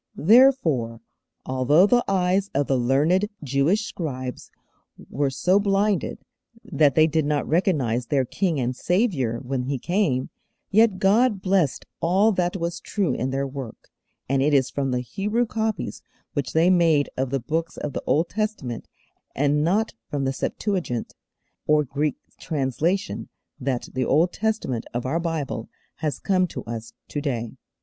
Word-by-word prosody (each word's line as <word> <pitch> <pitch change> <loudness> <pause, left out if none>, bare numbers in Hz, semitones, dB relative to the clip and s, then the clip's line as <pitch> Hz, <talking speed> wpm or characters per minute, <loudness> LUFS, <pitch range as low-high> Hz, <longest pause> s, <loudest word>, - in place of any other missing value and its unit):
Therefore, 165 - +4 0.5
although 130 +7 +4
the 240 +3 +3
eyes 190 +1 +1
of 140 +1 +2
the 135 - +1
learned 145 +11 +2
Jewish 145 - +1
scribes 130 -9 -5 0.6
were 140 0 0
so 180 +8 +2
blinded, 200 0 +1 0.5
that 145 -4 +2
they 155 - +6
did 160 0 +1
not 145 0 0
recognize 145 - +1
their 135 -3 +1
King 170 +2 -1
and 125 0 -1
Saviour 175 - 0
when 125 +1 -3
He 135 +1 -1
came, 160 - 0 0.4
yet 215 -1 +4
God 210 +3 +3
blessed 185 -7 +1
all 190 +6 +3
that 180 -1 0
was 170 0 -3
true 190 -10 -1
in 130 +2 -2
their 135 +1 -1
work, 135 -4 -8 0.4
and 135 0 +1
it 145 +1 +3
is 130 -2 +2
from 140 -1 -1
the 125 -1 0
Hebrew 210 - -1
copies 220 -1 -3 0.3
which 140 -4 -2
they 165 +3 +4
made 165 -5 +4
of 130 0 -1
the 135 +1 0
Books 160 +6 -3
of 150 - -4
the - - -3
Old 160 +3 +2
Testament, 210 - -3 0.5
and 145 +2 +2
not 205 +7 +1 0.2
from 140 -2 -2
the 135 - 0
'Septuagint,' 165 - -2 0.5
or 150 0 +4
Greek 145 +1 -1 0.2
translation, 160 - -1 0.3
that 130 -2 -2
the 130 -1 0
Old 165 +8 +3
Testament 215 - -2
of 120 - -2
our 150 +6 0
Bible 155 -9 -3 0.3
has 150 -2 -2
come 185 -2 +1
to - - -7
us 115 0 -6 0.2
to 145 - -3
day. 120 -6 -2
150 Hz, 155 wpm, -24 LUFS, 130-190 Hz, 0.6 s, they